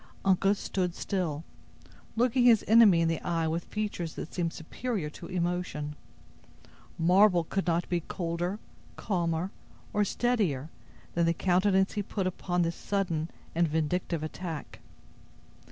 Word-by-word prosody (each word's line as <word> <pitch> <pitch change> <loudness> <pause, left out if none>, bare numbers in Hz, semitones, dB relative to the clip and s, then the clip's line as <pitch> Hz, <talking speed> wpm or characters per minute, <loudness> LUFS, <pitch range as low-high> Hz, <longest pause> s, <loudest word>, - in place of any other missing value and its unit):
Uncas 195 +1 +3
stood 180 -3 -2
still, 165 -6 -2 0.7
looking 245 +2 +3
his 230 -4 +6
enemy 215 -6 +7
in 165 - +3
the 165 -1 -1
eye 165 -2 0
with 165 +2 -2
features 205 -6 -3
that - - -7
seemed 170 -2 -1
superior 175 0 -4
to - - -9
emotion. 175 -4 -2 1.0
Marble 180 +1 +5
could 195 +3 -2
not 170 0 +1
be 175 - 0
colder, 175 +3 -3 0.4
calmer, 175 -2 -1 0.4
or 210 - +3
steadier 195 - 0 0.4
than 170 0 +2
the 170 - +2
countenance 190 +2 +2
he 210 - -1
put 195 -1 -3
upon 180 -1 0
this 170 0 -1
sudden 175 -5 -1 0.2
and 170 +1 +2
vindictive 160 +1 -1
attack. 160 -1 -6
175 Hz, 135 wpm, -29 LUFS, 165-195 Hz, 1.0 s, enemy